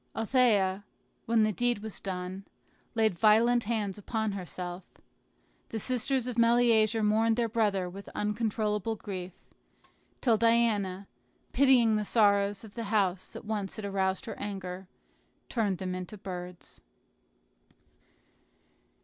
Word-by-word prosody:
Althea, 215 -5 +2 0.4
when 225 -1 +3
the 215 - +2
deed 240 0 0
was 220 -2 -5
done, 185 0 -5 0.5
laid 220 -3 +3
violent 230 +2 +4
hands 210 -3 -2
upon 220 +1 -2
herself. 180 -1 -6 0.9
The 225 - -4
sisters 255 +2 0
of 245 -2 -3
Meleager 230 -2 +4
mourned 220 +2 +3
their 235 0 +1
brother 210 -5 0
with 195 +3 -9
uncontrollable 210 0 -1
grief; 185 -3 -6 0.9
till 230 -4 +3
Diana, 210 -4 +2 0.5
pitying 245 -5 +5
the 210 - -1
sorrows 200 -2 +2
of 215 -2 -12
the 230 -1 -5
house 195 -3 0
that - - -9
once 205 -3 -3
had 215 - -5
aroused 190 +3 -1
her 230 - -7
anger, 190 -2 -6 0.6
turned 210 -6 0
them 185 0 -4
into 185 +3 -6
birds. 180 -2 -8
210 Hz, 125 wpm, -29 LUFS, 195-230 Hz, 0.9 s, pitying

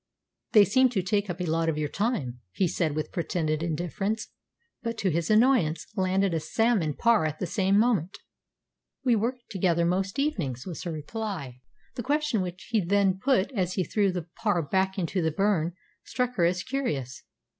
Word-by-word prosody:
"They 210 -3 +8
seem 260 +6 +4
to 200 -7 -1
take 200 +2 0
up 175 +1 -4
a 180 - -1
lot 165 0 +1
of 155 - -1
your 150 -1 0
time," 150 - -2
he 185 - +1
said 160 -3 -1
with 155 - -3
pretended 160 -3 -1
indifference, 175 +6 -2 0.5
but, 230 -2 -3
to 195 -4 0
his 165 +1 -1
annoyance, 215 - +3
landed 190 -1 +1
a 165 - +1
salmon 170 - +1
parr 230 -6 +3
at 155 0 -5
the 185 - -2
same 195 +3 +2
moment. 210 -6 +2 0.9
"We 245 -2 +4
work 230 +4 0 0.2
together 175 -4 +1
most 190 +2 0
evenings," 165 - -1
was 175 -4 -6
her 170 - -2
reply. 155 - -5 0.3
The - - -4
question 290 -3 0
which 180 0 -6
he 220 -4 +2
then 195 +1 +2
put 255 -2 +2
as 185 -7 -1
he 185 - 0
threw 200 +2 +1
the 180 -2 -3 0.2
parr 205 -7 +2
back 190 +6 0
into 185 0 -1
the 160 - +2
burn 175 -1 +1 0.3
struck 250 -1 -2
her 175 -7 +2
as 180 +2 +1
curious. 155 - -3
190 Hz, 185 wpm, -27 LUFS, 165-220 Hz, 0.9 s, They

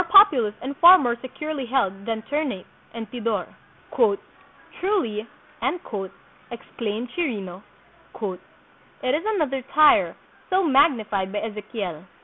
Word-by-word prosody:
populous 300 - +6
and 275 +2 -5
far 355 +2 +10
more 245 -7 0
securely 275 +2 -5
held 245 -8 +2
than 225 -1 -3
Ternate 285 - -2 0.3
and 225 -1 -5
Tidor. 230 -3 -2 1.3
"Truly," 235 - -1 1.2
exclaimed 230 0 -5
Chirino, 200 - -3 0.6
"it 210 +5 -6
is 315 - -2
another 270 -7 -1
Tyre, 305 0 +5 0.3
so 375 +1 +2
magnified 250 - +2
by 205 - -2
Ezekiel." 210 -6 -5
240 Hz, 105 wpm, -24 LUFS, 210-300 Hz, 1.3 s, far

